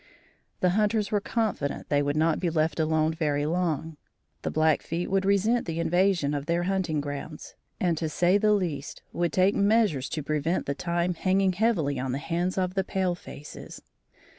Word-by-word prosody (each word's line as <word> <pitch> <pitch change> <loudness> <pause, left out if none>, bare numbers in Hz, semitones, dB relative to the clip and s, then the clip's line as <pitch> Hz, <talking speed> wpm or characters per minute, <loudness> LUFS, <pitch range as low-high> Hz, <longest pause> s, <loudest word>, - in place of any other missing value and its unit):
The 180 - +3
hunters 210 +1 +1
were 205 -1 +1
confident 210 - -2
they 145 -1 +3
would 145 0 -1
not 160 0 +2
be 175 - 0
left 160 -1 0
alone 160 0 +2
very 150 -3 0
long. 160 -2 -1 0.4
The - - -2
Blackfeet 160 +3 0
would 195 0 +2
resent 200 +4 +2
the 165 0 -3
invasion 175 -3 +2
of 145 0 -3
their 170 +1 +1
hunting 180 -5 0
grounds, 145 +2 -7 0.3
and 175 -3 +1
to 160 - -1
say 175 +5 +3
the 210 0 +4
least, 165 -9 -3
would 170 -2 0
take 185 +5 +3
measures 200 - +2
to 155 - -3
prevent 155 +4 -1
the 140 - -1
time 170 +3 -1
hanging 190 +2 +1
heavily 175 - +1
on 130 0 -2
the - - -1
hands 175 +5 -2
of 185 -1 0
the 190 0 0
pale 185 -1 0
faces. 150 -4 -10
170 Hz, 180 wpm, -27 LUFS, 155-190 Hz, 0.4 s, the